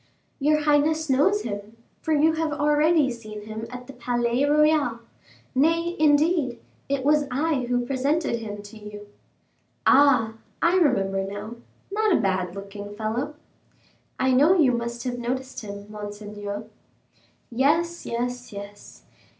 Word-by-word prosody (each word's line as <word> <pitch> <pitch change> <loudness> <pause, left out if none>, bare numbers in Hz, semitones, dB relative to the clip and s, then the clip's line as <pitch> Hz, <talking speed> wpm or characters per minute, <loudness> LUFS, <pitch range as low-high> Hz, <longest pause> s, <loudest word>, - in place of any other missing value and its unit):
"Your 300 +2 +3
highness 300 +1 +2
knows 385 +11 +3
him, 205 +1 -6 0.2
for 320 - -2
you 310 +1 +4
have 320 -1 -1
already 295 0 +3
seen 215 -3 -8
him 220 +1 -6
at 250 0 -8
the 275 - -11
Palais 240 +1 0
Royal; 295 -5 +3 0.5
nay, 330 +5 +2
indeed, 295 -4 +3 0.3
it 275 -1 -1
was 295 0 +3
I 275 0 0
who 245 0 +1
presented 275 0 0
him 205 -2 -7
to 205 +2 -12
you." 210 0 -10 0.8
"Ah, 250 -5 +5 0.2
I 340 - +3
remember 195 - +2
now 205 +4 -6 0.3
not 430 +1 +1
a - - +4
bad 185 -2 -1
looking 205 +1 -8
fellow." 235 +8 -3 0.8
"I 260 - +3
know 295 +9 +5
you 285 -7 +5
must 235 0 -3
have 245 -1 -3
noticed 260 +2 -3
him, 200 -1 -8
monseigneur." 205 0 -6 0.9
"Yes, 320 +8 +1
yes, 245 +1 -3
yes. 200 0 -10
250 Hz, 135 wpm, -25 LUFS, 215-300 Hz, 0.9 s, Ah